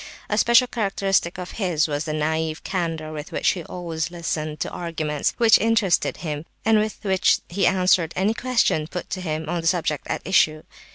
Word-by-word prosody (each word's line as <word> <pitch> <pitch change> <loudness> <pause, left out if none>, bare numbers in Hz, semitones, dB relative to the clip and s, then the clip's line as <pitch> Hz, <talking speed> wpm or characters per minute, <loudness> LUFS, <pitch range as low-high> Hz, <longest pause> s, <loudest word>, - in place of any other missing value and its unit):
A 210 - 0
special 235 +2 +5
characteristic 195 -6 0
of 180 -1 -6
his 165 -6 +1
was 145 0 -2
the 155 - -3
naive 155 +1 -1
candour 165 -4 -3
with 150 +1 -7
which - - +1
he 175 - -2
always 165 -2 -4
listened 155 -3 -4
to - - -1
arguments 160 -4 -2
which 230 -2 +6
interested 220 -5 +2
him, 150 -1 -3 0.2
and 220 -1 +5
with 215 0 -2
which 190 -5 +3
he 185 +1 +1
answered 180 -3 +3
any 195 +4 +1
questions 230 -11 +1
put 180 - -6
to 185 - -3
him 155 -2 -3
on 170 +1 -1
the 165 - -2
subject 165 -4 0
at - - -3
issue. 155 -5 +3
175 Hz, 185 wpm, -23 LUFS, 155-195 Hz, 0.2 s, which